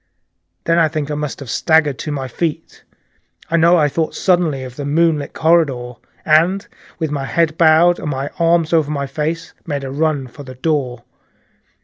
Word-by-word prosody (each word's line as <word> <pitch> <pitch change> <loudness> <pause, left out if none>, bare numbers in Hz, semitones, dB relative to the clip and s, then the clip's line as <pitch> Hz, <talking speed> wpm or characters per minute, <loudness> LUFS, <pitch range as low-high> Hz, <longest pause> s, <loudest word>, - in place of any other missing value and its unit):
Then 170 0 +2
I 165 - +4
think 150 -1 -4
I - - -1
must 150 -1 -4
have 135 - -8
staggered 155 -4 +2
to 150 - -4
my 135 -2 -3
feet. 160 +5 -4 0.7
I 170 - +3
know 170 +2 +5
I 150 -3 +3
thought 160 +2 -2
suddenly 170 -7 +1
of 125 -1 -9
the 145 - -6
moonlit 150 0 +1
corridor, 145 -7 +1 0.3
and 170 +6 +3 0.3
with 160 -3 -3
my 140 -2 -3
head 155 +5 0
bowed 165 +2 +4
and 155 - -4
my 135 0 -3
arms 170 0 +2
over 155 -3 +2
my 140 -2 -2
face, 155 +4 -4
made 145 -3 -3
a 135 0 -5
stumbling 145 - -5
run 150 -5 0
for 125 +4 -13
the 130 -2 -10
door. 130 -4 -2
155 Hz, 190 wpm, -18 LUFS, 140-165 Hz, 0.7 s, know